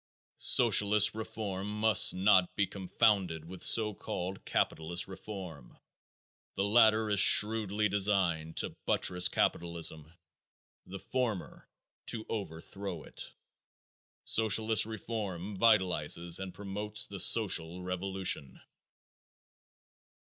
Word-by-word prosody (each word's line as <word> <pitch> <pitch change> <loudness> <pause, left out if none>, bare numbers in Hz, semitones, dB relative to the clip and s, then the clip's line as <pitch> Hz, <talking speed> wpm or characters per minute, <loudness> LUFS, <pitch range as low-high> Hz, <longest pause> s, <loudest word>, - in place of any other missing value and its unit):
Socialist 105 0 +5
reform 105 -3 -7
must 110 -3 +6
not 95 -1 +1
be 100 - 0
confounded 95 -3 -1
with 90 +1 -12
so 110 -2 +3
called 95 0 -7
capitalist 85 +3 -2
reform. 95 - -11 0.8
The 100 - -2
latter 110 +1 +3
is 100 - +2
shrewdly 105 0 +4
designed 95 -6 -1
to - - -3
buttress 90 0 +2
capitalism; 85 -2 -2 0.8
the 95 +2 -9
former 115 -3 -5 0.4
to 110 -2 -3
overthrow 95 -2 -7
it. - - -7 0.9
Socialist 110 0 +2
reform 105 -4 -7
vitalizes 90 -6 0
and 95 -1 -7
promotes 105 +2 -3
the 100 - -9
social 90 -5 +3
revolution. 90 -6 -2
95 Hz, 95 wpm, -30 LUFS, 90-105 Hz, 0.9 s, must